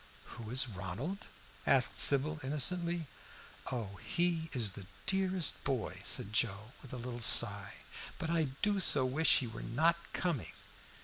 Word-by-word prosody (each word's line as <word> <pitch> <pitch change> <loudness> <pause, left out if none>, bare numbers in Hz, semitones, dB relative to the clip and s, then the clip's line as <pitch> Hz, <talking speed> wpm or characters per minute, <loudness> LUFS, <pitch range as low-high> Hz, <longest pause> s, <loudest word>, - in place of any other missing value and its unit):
"Who 115 -2 -10
is 130 +2 +2
Ronald?" 110 - -6 0.4
asked - - +5
Sybil 145 +3 +5
innocently. 170 +5 -1 0.7
"Oh, 105 -6 -6
he 170 - -2
is 115 -7 -1
the 95 0 -11 0.2
dearest 190 -3 0
boy," 130 -5 -4
said 105 - -3
Joe, 110 0 0
with 135 - -14
a 125 - -7
little 120 0 -7
sigh, 100 -3 +3 0.4
"but 160 - -4
I 165 -2 +1 0.2
do 205 -1 +1
so 145 -7 +5
wish 145 +6 +3
he 130 - -2
were 115 -1 -9
not 160 +9 +1
coming!" 170 - -3
135 Hz, 145 wpm, -32 LUFS, 115-170 Hz, 0.7 s, asked